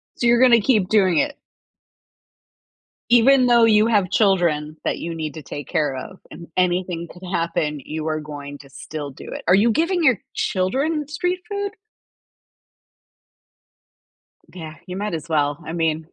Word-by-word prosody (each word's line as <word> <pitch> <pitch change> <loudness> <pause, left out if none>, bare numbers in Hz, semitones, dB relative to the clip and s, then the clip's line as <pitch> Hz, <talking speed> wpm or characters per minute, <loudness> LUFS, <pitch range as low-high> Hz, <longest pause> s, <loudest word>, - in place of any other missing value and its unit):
So, 240 - 0
you're 240 +1 +4
gonna 240 -3 +6
keep 205 -5 +2
doing 190 -6 +3
it. 290 -1 0 1.7
Even 250 +2 +6
though 240 -1 +5
you 215 -1 +5
have 205 -6 +1
children 170 -7 +1
that - - -1
you 165 0 -5
need 155 -2 -4
to 155 - -8
take 145 +1 -8
care 150 -6 0
of, 190 +9 -8
and 170 - -11
anything 180 -1 0
could 180 +1 -11
happen, 165 -4 -1
you 155 +2 -5
are 155 0 -1
going 145 -1 -8
to 140 - -15
still 145 +1 -7
do 135 - -12
it. - - -6
Are 180 - +6
you 225 +4 +4
giving 335 - +1
your 255 -10 +4 0.2
children 275 - -1
street 355 +5 -2
food? 405 0 -3 2.8
G 185 - -12
yeah. 155 0 -8
You 180 0 -7
might 205 -1 -3
as 160 0 -5
well. 145 -2 0
I 165 - -5
mean 160 -1 -1
180 Hz, 165 wpm, -21 LUFS, 155-235 Hz, 2.8 s, gonna